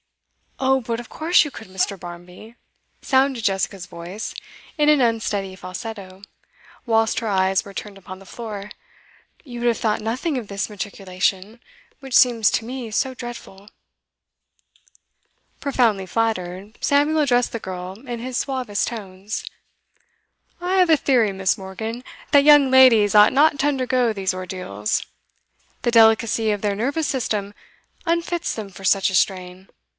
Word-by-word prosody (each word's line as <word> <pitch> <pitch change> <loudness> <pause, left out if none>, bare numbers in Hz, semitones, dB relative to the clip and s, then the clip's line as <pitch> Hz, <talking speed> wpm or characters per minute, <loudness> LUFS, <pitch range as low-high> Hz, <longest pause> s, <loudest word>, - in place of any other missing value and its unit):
'Oh 265 0 +3
but 230 -1 -3
of 240 - -10
course 330 +3 +3
you 295 - -5
could, 220 - -10
Mr. 190 +1 -2
Barmby,' 175 +6 -11 0.5
sounded 265 -3 +1
Jessica's 195 -2 -1
voice, 180 +4 -7 0.4
in 300 0 +3
an 300 -3 +5
unsteady 215 -5 -1
falsetto, 190 0 -8 0.6
whilst 225 -1 +2
her 230 - -4
eyes 190 -1 +2
were 200 - -10
turned 200 0 -7
upon 185 0 -10
the 195 - -15
floor. 210 -3 -7 0.7
'You 245 -6 -8
would 240 - 0
have 235 - +2
thought 215 -2 0
nothing 255 +8 -2
of 235 -4 -5
this 200 +1 -3
matriculation, 195 +1 -3 0.4
which 270 -3 -5
seems 235 -4 +5
to 225 - -1
me 245 -2 -6
so 260 +4 0
dreadful.' 235 -5 -9 1.9
Profoundly 235 -9 +1
flattered, 200 -1 -2
Samuel 290 +2 +2
addressed 245 -4 +2
the 230 - -4
girl 185 -2 -6
in 240 -1 -4
his 250 +1 -4
suavest 255 -7 -1
tones. 200 -2 -6 1.1
'I 360 +2 0
have 365 -2 +4
a 315 - +6
theory, 245 -7 +2
Miss. 190 0 0
Morgan, 220 +6 -6 0.3
that 285 -2 +6
young 290 -2 +7
ladies 240 -6 +6
ought 210 0 +7
not 290 +2 +4
to 285 - +2
undergo 255 -4 +1
these 190 -2 -1
ordeals. 180 - -3 0.8
The 240 - +1
delicacy 225 -1 +4
of 205 -1 -2
their 205 -1 0
nervous 280 +9 -1
system 215 -7 -2 0.5
unfits 340 0 -1
them 215 -3 -6
for 195 0 -13
such 195 +1 +3
a 190 - -2
strain. 185 0 -1
220 Hz, 150 wpm, -22 LUFS, 195-255 Hz, 1.9 s, young